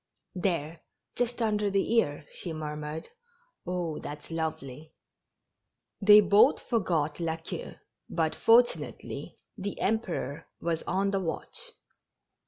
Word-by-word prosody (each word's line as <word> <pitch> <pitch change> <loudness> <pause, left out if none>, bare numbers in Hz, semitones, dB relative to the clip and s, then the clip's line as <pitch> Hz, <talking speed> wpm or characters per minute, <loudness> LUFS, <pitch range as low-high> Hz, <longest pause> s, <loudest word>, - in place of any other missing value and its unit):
" - - -54
There, 165 -2 -2 0.3
just 245 0 -1
under 210 -2 +1
the 195 +3 +1
ear," 145 -8 +1
she 170 - -5
murmured. 150 0 -5 0.3
" 480 - -34
Oh, 175 -3 -2
it's 150 +2 -7
lovely!" 160 -2 -4 1.1
They 210 +1 +9
both 200 +1 +5
forgot 170 - 0
La 165 -1 0
Queue, 165 - -7 0.3
but, - - 0
fortunately, 485 +2 +2 0.2
the 200 +1 -4
Emperor 185 - -1
was 165 -1 -1
on 195 +2 +1
the 195 - +1
watch. 470 - -4
180 Hz, 120 wpm, -29 LUFS, 155-210 Hz, 1.1 s, They